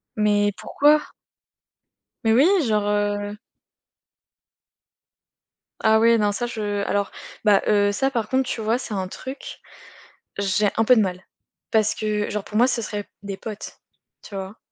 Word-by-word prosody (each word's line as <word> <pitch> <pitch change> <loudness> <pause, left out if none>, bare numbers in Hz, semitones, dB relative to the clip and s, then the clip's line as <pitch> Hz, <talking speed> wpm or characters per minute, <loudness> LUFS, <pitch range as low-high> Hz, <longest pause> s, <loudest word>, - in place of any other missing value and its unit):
Mais 205 -1 +2
pourquoi? 295 +1 +3 1.2
Mais 225 - +3
oui, 260 +6 +6 0.2
genre 210 -2 +1
heu 205 0 -1 2.4
Ah 220 0 +4
oui 230 +1 +5
non 210 -2 +2
ça 240 +4 -2
je 205 -3 -3
alors 200 -1 -1 0.3
bah 205 -2 +5
heu, 205 -1 +3
ça 270 +6 0
par 225 -4 -2
contre 260 0 +1
tu 225 - -3
vois, 220 +2 +1
c'est 245 -4 -6
un 190 -2 -2
truc 260 +8 -8 0.8
j'ai 200 +1 +2
un 225 - +3
peu 250 +2 +6
de - - +5
mal. 185 -2 -2 0.5
Parce 215 -1 +2
que 210 -1 -2
genre, 210 -1 -3
pour 210 - -6
moi, 240 +3 +6
ce 255 -2 -1
serait 210 -1 -4
p - - -37
des 200 -1 -5
potes, 215 0 -8 0.4
tu 205 - -12
vois? 195 +2 -6
210 Hz, 160 wpm, -23 LUFS, 205-225 Hz, 2.4 s, oui